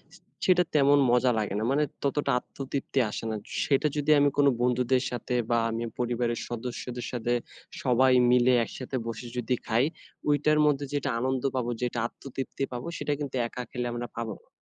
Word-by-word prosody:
স - - -15 0.3
সেটা 180 -1 +5
তেমন 145 0 +5
মজা 125 +1 +4
লাগে 105 -2 -2
না। - - -2
মানে 145 +2 +3 0.2
ততটা 140 0 +1
আত্মতৃপ্তি 135 +1 -4
আসে 105 - -5
না। - - -2 0.3
সেটা 140 +1 +3
যদি 145 +1 +2
আমি 145 0 +5
কোনো 145 -1 +6
বন্ধুদের 125 +1 +2
সাথে 125 0 -3 0.2
বা 115 - +4
আমি 115 +1 -2 0.2
পরিবারের 120 -1 0
সদস্যদের 120 +1 -5
সাথে 120 -1 -1 0.5
সবাই 130 0 +4 0.2
মিলে 125 0 +5
একসাথে 130 +3 -5
বসে 115 +1 -5
যদি 125 +1 0
খাই 115 +3 +3 0.5
ওইটার 150 +1 +3
মধ্যে 145 -1 +2
যেটা 145 -1 0
আনন্দ 130 +1 -1
পাবো 125 -2 -1
যেটা 120 -1 -1
আত্মতৃপ্তি 135 +2 -6
পাবো 125 +4 -5
সেটা 145 - -1
কিন্তু 140 -3 -4
একা 125 +1 -6
খেলে 125 0 -3
আমরা 120 0 -4
পাবো 115 -2 -3
না, - - -32
125 Hz, 175 wpm, -28 LUFS, 120-140 Hz, 0.5 s, কোনো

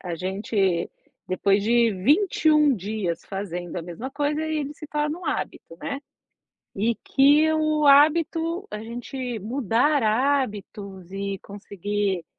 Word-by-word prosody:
a 175 -2 -4
gente 190 0 -1 0.4
depois 195 +2 +2
de 235 +1 +3
21 300 - +3
dias 200 -3 -3
fazendo 180 -3 -5
a 170 - -3
mesma 180 +10 -7
coisa, 295 +1 -1
aí 315 -1 -1
ele 290 0 -3
se 305 - -10
torna 300 +2 -2
um 360 - -9
hábito, 165 - -4
né. 280 0 -4 0.8
E 225 +3 +1
que 295 +3 +4
o 310 -1 +1
hábito 325 +6 +4
a 210 - -4
gente 245 +1 -5
mudar 255 +6 +1
hábitos 215 -6 -1
e 195 0 -3
conseguir, 200 -2 -3
230 Hz, 130 wpm, -24 LUFS, 195-295 Hz, 0.8 s, que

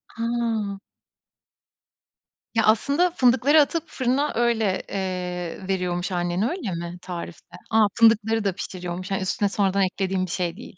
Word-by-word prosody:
A! 230 -4 -1 1.8
Ya, 225 - +3
aslında 285 - +3
fındıkları 265 +1 +4
atıp 330 +2 0
fırına 260 +3 0
öyle, 225 -5 +1
eee, 180 -1 -4
veriyormuş 180 -1 -1
annen, 175 +1 -1
öyle 300 - -4
mi 170 +1 -5
tarifte? 175 -2 -8 0.2
A, 220 -1 +5
fındıkları 225 -1 +4
da 195 -2 0
pişiriyormuş, 185 0 -6
hani 195 - 0
üstüne 200 +2 0
sonradan 200 -1 +1
eklediğin 185 0 -1
bir 175 - -7
şey 175 0 -2
değil. 225 -6 -12
200 Hz, 135 wpm, -24 LUFS, 180-230 Hz, 1.8 s, A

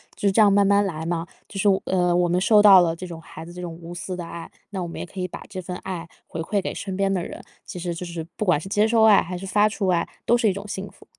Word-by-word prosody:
就 205 - -1
是 - - +1
这 210 - +1
样 205 -2 +6
慢 200 0 +4
慢 200 +1 +4
来 160 -4 -4
嘛， 170 0 -2 0.2
就 195 - -6
是， 205 - +2 0.2
呃， 180 -2 +2
我 175 0 +2
们 175 +1 +2
受 210 +2 +5
到 200 -2 +9
了 165 -1 +1
这 185 - -7
种 170 -2 -8
孩 160 - -10
子 170 - -10
这 180 +1 -8
种 170 -2 -5
无 170 +1 -9
私 180 +1 -5
的 175 -1 -6
爱， 165 0 -8 0.2
那 195 -3 -4
我 175 - -3
们 170 - -8
也 - - -4
可 185 +2 -10
以 180 - -1
把 - - -9
这 185 - -6
份 180 +1 -6
爱 175 -3 -5 0.2
回 165 - -7
馈 195 +5 -1
给 - - -4
身 195 -2 -5
边 195 0 +1
的 180 - 0
人， - - -8 0.2
其 - - -8
实 175 0 -3
就 175 +2 -6
是 170 -2 -5
不 215 - -1
管 170 -5 +3
是 190 - -8
接 210 +2 +3
受 225 -1 +3
爱 215 -2 +7
还 180 +2 -5
是 195 - -7
发 205 +2 +3
出 210 -2 -2
爱， 170 -2 +1 0.2
都 240 - +4
是 230 -2 +2
一 - - 0
种 200 +2 -7
幸 200 -1 -5
福。 - - -20
185 Hz, 345 characters per minute, -23 LUFS, 170-200 Hz, 0.2 s, 到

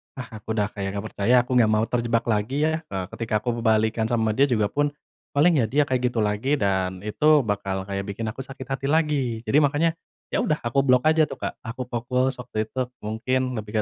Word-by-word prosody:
ah 115 -4 -8
aku 110 +1 -4
udah 105 -1 0
kayak 100 -1 -4
nggak 100 +2 -4
percaya, 115 +5 +2
aku 125 - -10
nggak 110 -2 +4
mau 110 +1 +3
terjebak 115 -1 +1
lagi 115 +7 0
ya, 160 - +2
eee, 95 -5 -3
ketika 115 -2 -4
aku 120 -1 -1
balikkan 110 0 +2
sama 115 -2 +1
dia 135 +6 +3
juga 110 -5 +1
pun 145 0 +1 0.5
paling, 155 +1 +4
ya 115 - +3
dia 145 +5 +3
kayak 130 -2 0
gitu 115 -3 0
lagi 105 +8 +1
dan 95 -4 -1
itu 150 +7 +3
bakal 95 -3 -2
kayak 100 0 -4
bikin 100 +3 -5
aku 120 - -14
sakit 130 0 -7
hati 135 0 -2
lagi. 140 -7 +1
Jadi 120 +5 +2
makanya, 150 +3 +3 0.4
ya - - +1
udah 155 - +1
aku 120 +4 +1
blok 125 -2 +4
aja 155 0 +4
tuh, - - -7
Kak, - - -5
aku 125 +2 -6
fokus 125 +2 0
waktu 110 -3 -3
itu 130 +3 -3 0.2
mungkin 130 +4 -1
lebih 105 +1 -2
120 Hz, 215 wpm, -24 LUFS, 110-135 Hz, 0.5 s, nggak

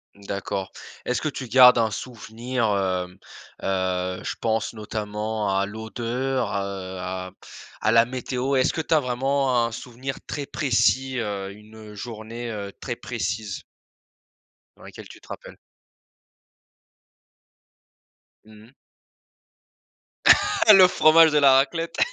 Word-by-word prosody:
D'accord. 100 -1 -5 0.3
Est-ce 125 - -1
que 155 - -2
tu 135 -3 -5
gardes 125 -1 +8
un 110 -2 +1
souvenir, 120 +2 -4
hem, 95 -2 -1 0.5
heu, 95 -1 -1
je - - -4
pense 110 -1 -1
notamment 105 -1 -4
à 100 - +1
l'odeur, 120 +4 -3
heu 95 -1 -4
à 95 0 -5 0.5
à 110 - +2
la 115 0 +5
météo. 130 +2 -3
Est-ce 130 - +3
que - - -4
tu 160 - -1
as 155 - +5
vraiment 130 -1 +1
un 115 - -4
souvenir 125 +3 -6
très 145 -1 -5
précis 130 -1 +1
heu, 100 -3 -4
une, 105 +2 -15 0.2
heu, 105 - -12
journée 110 -1 -6
très 120 -3 -4
précise 105 -3 -4 1.1
dans - - -18
laquelle - - -11
tu - - -14
te - - -19
rappelles? - - -10 2.9
Mmh 110 0 -16
mh. 125 - -22 2.0
Le 185 -2 +9
fromage 160 -2 +5
et - - +6
la 140 -2 +6
raclette. 155 +5 +1
115 Hz, 125 wpm, -24 LUFS, 100-130 Hz, 2.9 s, Le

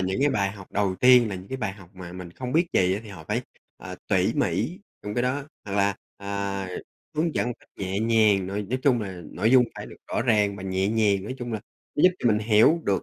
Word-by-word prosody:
những 95 +7 -1
cái 145 - +4
bài 100 -6 +1
học 100 -2 -12
đầu 100 -2 +1
tiên 125 -2 +7
là 100 - -4
những 95 +1 -9
cái 130 - -3
bài 110 -6 -2
học 95 -3 -15
mà 90 -1 -9
mình 90 -1 -8
không 125 +7 -6
biết 170 +3 +3
gì 90 0 +3
á 100 - -4
thì 110 - -12
họ 95 -6 -10
phải, - - 0 0.4
à, - - -8
tỉ - - +2
mỉ 175 +3 0 0.2
trong 105 0 -5
cái 120 - +1
đó. 130 +3 0 0.2
Hoặc 100 - -6
là, 100 0 +2 0.2
à, 100 -1 -3 0.5
hướng 160 +1 0
dẫn - - +1
một 120 - -3
cách - - -24
nhẹ 95 +1 -2
nhàng, 110 -4 +3
nói 100 +2 -3
nói 125 +6 -2
chung 125 -5 +3
là 95 -4 -6
nội 110 +5 +1
dung 130 -1 +7
phải - - -7
được - - -12
rõ - - 0
ràng 105 -4 +2
và 95 - -8
nhẹ 95 0 0
nhàng, 105 -3 +2
nói 130 +5 -5
chung 120 -1 -5
là 110 - -2 0.3
nó 145 - 0
giúp 180 - +8
cho 120 - +2
mình 105 -2 +3
hiểu 110 +9 +4
được 95 -3 +1
105 Hz, 265 wpm, -25 LUFS, 95-120 Hz, 0.5 s, giúp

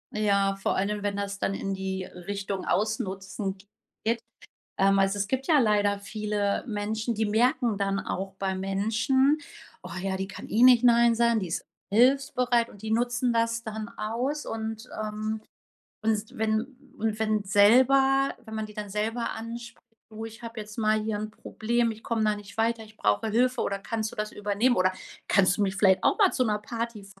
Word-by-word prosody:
Ja, 200 -2 +2
vor 195 - -1
allem, 205 +2 -1
wenn 205 0 -1
das 200 0 -3
dann 195 - -1
in 195 0 -3
die 190 -1 -3
Richtung 195 +1 -5
Ausnutzen 195 -1 -2 0.5
geht. 230 +1 +1 0.6
Ähm, 195 0 +4
also 195 +1 +2
es 200 - 0
gibt 265 +3 -1
ja 310 -3 +5
leider 205 -3 +2
viele 205 0 -2
Menschen, 220 +2 -2
die 220 +1 +1
merken 235 +1 +2
dann 195 0 0
auch 190 +1 -4
bei 195 -1 -1
Menschen: 220 +9 +2 0.5
„Oh 180 - -8
ja, 190 0 -1
die 190 - -3
kann 200 - -9
eh 230 +3 +3
nicht 250 -1 +7
nein 235 -1 +5
sagen, 235 -1 +3
die 185 - -3
ist 165 - -3 0.3
hilfsbereit“ 250 0 +3
und 205 - -15
die 220 0 -4
nutzen 240 +1 +1
das 230 0 0
dann 220 -1 -5
aus. 250 +7 -2
Und, 225 +1 -5
ähm 215 0 -3 0.6
und 220 -1 -1
wenn 220 0 +1 0.4
und 220 -1 -1
wenn 215 -1 +1
selber 260 +7 +5
wenn 220 -1 -9
man 220 0 -3
die 210 - -13
dann 210 -1 -5
selber 220 +4 -2
anspricht: 230 +1 -8 0.3
„Du 220 +1 -7
ich 225 +1 -12
habe 230 -1 -6
jetzt 210 +1 -10
mal 215 -1 +2
hier 215 -1 -2
ein 215 0 -5
Problem, 235 +2 -1
ich 220 0 -9
komme 225 -2 0
da 210 -1 +2
nicht 205 0 -12
weiter, 225 0 0
ich 215 0 -17
brauche 105 - +1
Hilfe 250 +4 +2
oder 200 0 -2
kannst 220 +1 -3
du - - -11
das 215 0 -2
übernehmen, 210 +4 +1
oder 185 0 +3 0.3
kannst 185 -3 +3
du 210 - +1
mich 190 -1 0
vielleicht 190 -2 +4
auch - - +4
mal 395 -3 +5
zu 255 - +1
'ner 210 -2 0
Party 230 -1 -5
fahren?“ 195 0 -17
215 Hz, 190 wpm, -27 LUFS, 200-230 Hz, 0.6 s, nicht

